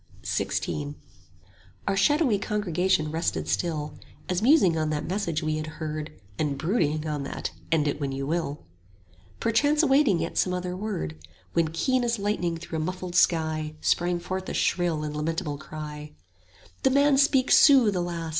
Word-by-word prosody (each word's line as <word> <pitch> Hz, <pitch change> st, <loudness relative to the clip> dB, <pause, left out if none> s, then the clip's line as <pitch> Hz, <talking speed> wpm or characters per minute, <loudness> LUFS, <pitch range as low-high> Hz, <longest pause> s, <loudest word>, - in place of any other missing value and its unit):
XVI 75 Hz, -3 st, -2 dB, 0.9 s
Our 195 Hz, -, +1 dB
shadowy 265 Hz, 0 st, +3 dB
congregation 185 Hz, -6 st, 0 dB
rested 165 Hz, +2 st, -1 dB
still, 150 Hz, -4 st, -2 dB, 0.3 s
As 180 Hz, +1 st, 0 dB
musing 235 Hz, -, +5 dB
on 155 Hz, -1 st, 0 dB
that 150 Hz, -1 st, -2 dB
message 170 Hz, -4 st, -2 dB
we 155 Hz, 0 st, 0 dB
had 155 Hz, 0 st, -4 dB
heard 155 Hz, -, -5 dB, 0.2 s
And 145 Hz, -2 st, 0 dB
brooding 155 Hz, -, 0 dB
on 150 Hz, -2 st, -2 dB
that 140 Hz, -, -4 dB, 0.2 s
"End 155 Hz, -2 st, +2 dB
it 145 Hz, -, -2 dB
when 140 Hz, -1 st, -1 dB
you 135 Hz, 0 st, -3 dB
will;" 155 Hz, -1 st, -3 dB, 0.7 s
Perchance 290 Hz, +7 st, +2 dB
awaiting 270 Hz, -, +4 dB
yet -, -, -2 dB
some 180 Hz, -1 st, +1 dB
other 180 Hz, 0 st, -3 dB
word; 180 Hz, -, -4 dB, 0.3 s
When 165 Hz, -1 st, +2 dB
keen 250 Hz, -, 0 dB
as 235 Hz, -1 st, 0 dB
lightning 200 Hz, -5 st, -1 dB
through 165 Hz, -1 st, -6 dB
a -, -, -1 dB
muffled 180 Hz, +1 st, -4 dB
sky 155 Hz, -3 st, +2 dB
5 -, -, -12 dB
Sprang 175 Hz, 0 st, +2 dB
forth 185 Hz, +2 st, -4 dB
a -, -, -4 dB
shrill 170 Hz, -4 st, +1 dB
and 150 Hz, 0 st, -4 dB
lamentable 150 Hz, -1 st, -2 dB
cry: 150 Hz, -1 st, -8 dB, 0.7 s
The -, -, +4 dB
man 280 Hz, +1 st, +4 dB
speaks 275 Hz, -2 st, +4 dB
sooth, 255 Hz, -9 st, +6 dB
alas! 170 Hz, -2 st, -3 dB
170 Hz, 165 wpm, -26 LUFS, 155-205 Hz, 0.9 s, sooth